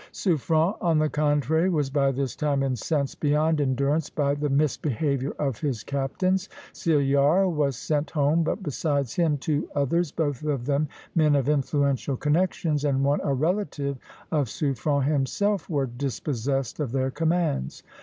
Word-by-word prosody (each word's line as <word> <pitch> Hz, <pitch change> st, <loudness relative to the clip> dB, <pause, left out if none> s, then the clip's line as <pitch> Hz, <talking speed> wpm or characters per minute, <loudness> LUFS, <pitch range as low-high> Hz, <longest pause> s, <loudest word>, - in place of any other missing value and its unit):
Suffren, 165 Hz, 0 st, +1 dB
on 165 Hz, -3 st, +2 dB
the 155 Hz, 0 st, +1 dB
contrary, 150 Hz, +3 st, +2 dB
was 150 Hz, -6 st, 0 dB
by 140 Hz, -1 st, +2 dB
this 135 Hz, -1 st, -3 dB
time 145 Hz, -3 st, 0 dB
incensed 135 Hz, +2 st, -1 dB
beyond 150 Hz, +1 st, +2 dB
endurance 140 Hz, +3 st, 0 dB
by 140 Hz, -2 st, 0 dB
the 145 Hz, 0 st, -2 dB
misbehavior 140 Hz, -1 st, 0 dB
of 135 Hz, -6 st, -2 dB
his 135 Hz, -8 st, -2 dB
captains. 185 Hz, +8 st, -1 dB, 0.2 s
Cillart 145 Hz, +4 st, +3 dB
was 145 Hz, -3 st, 0 dB
sent 150 Hz, +2 st, -1 dB
home; 150 Hz, +2 st, +2 dB
but 180 Hz, +5 st, -2 dB
besides 145 Hz, -4 st, -1 dB
him 165 Hz, -4 st, +1 dB
two 145 Hz, +2 st, -2 dB
others, 145 Hz, +3 st, +1 dB
both 145 Hz, -5 st, -2 dB
of 145 Hz, -5 st, -2 dB
them 145 Hz, +2 st, +1 dB, 0.3 s
men 155 Hz, -3 st, +3 dB
of 140 Hz, -2 st, +1 dB
influential 140 Hz, -2 st, +1 dB
connections, 155 Hz, 0 st, 0 dB
and 135 Hz, -2 st, +1 dB
one 140 Hz, +1 st, +2 dB
a 140 Hz, -, 0 dB
relative 145 Hz, -3 st, -1 dB, 0.3 s
of 145 Hz, -5 st, +1 dB
Suffren 140 Hz, +2 st, 0 dB
himself, 155 Hz, +7 st, 0 dB
were 145 Hz, -5 st, +1 dB
dispossessed 135 Hz, +1 st, -3 dB
of 145 Hz, -6 st, -2 dB
their 130 Hz, 0 st, 0 dB
commands. 160 Hz, -, -1 dB
145 Hz, 150 wpm, -25 LUFS, 135-155 Hz, 0.3 s, Cillart